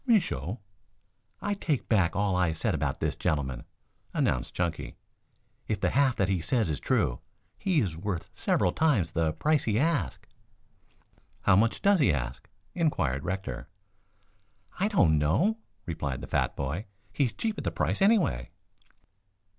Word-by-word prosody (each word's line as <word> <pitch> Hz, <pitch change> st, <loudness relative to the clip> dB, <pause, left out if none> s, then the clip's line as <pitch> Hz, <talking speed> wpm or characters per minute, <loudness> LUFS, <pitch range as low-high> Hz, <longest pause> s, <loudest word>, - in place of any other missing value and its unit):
"Me 235 Hz, -3 st, +7 dB
show." 125 Hz, -, -3 dB, 0.8 s
"I 205 Hz, -, 0 dB
take 160 Hz, -9 st, -1 dB
back 95 Hz, -7 st, +2 dB
all 100 Hz, -1 st, +1 dB
I 90 Hz, -3 st, +2 dB
said 80 Hz, -, -1 dB
about -, -, -1 dB
this -, -, 0 dB
gentleman," 65 Hz, -5 st, -1 dB, 0.5 s
announced -, -, 0 dB
Chunky. 85 Hz, -1 st, -2 dB, 0.7 s
"If 105 Hz, -, -1 dB
the -, -, +1 dB
half 135 Hz, -2 st, +3 dB
that 95 Hz, -, +1 dB
he 95 Hz, -3 st, 0 dB
says 100 Hz, +1 st, +1 dB
is 70 Hz, -, -3 dB
true, -, -, +1 dB, 0.4 s
he 180 Hz, -6 st, +1 dB
is 90 Hz, -8 st, -1 dB
worth 90 Hz, 0 st, -4 dB
several 90 Hz, -, +1 dB
times 115 Hz, -, +2 dB
the 80 Hz, -2 st, +1 dB
price 155 Hz, -, +1 dB
he 110 Hz, -2 st, +1 dB
asks." 160 Hz, +3 st, 0 dB, 1.1 s
"How 100 Hz, -, +5 dB
much 110 Hz, +4 st, +2 dB
does 200 Hz, -1 st, +5 dB
he 120 Hz, -, +4 dB
ask?" 60 Hz, -3 st, -4 dB, 0.2 s
inquired 80 Hz, -, 0 dB
Rector. 90 Hz, -9 st, -4 dB, 1.1 s
"I 195 Hz, -, +3 dB
don't 85 Hz, -, +4 dB
know," 170 Hz, -, +2 dB, 0.3 s
replied 75 Hz, -6 st, -3 dB
the -, -, -7 dB
fat -, -, 0 dB
boy. 75 Hz, +10 st, -3 dB, 0.3 s
"He's 130 Hz, -2 st, +1 dB
cheap 220 Hz, -2 st, -3 dB
at -, -, -5 dB
the -, -, 0 dB
price, -, -, -1 dB
anyway." 195 Hz, -, +3 dB
95 Hz, 155 wpm, -28 LUFS, -, 1.1 s, Me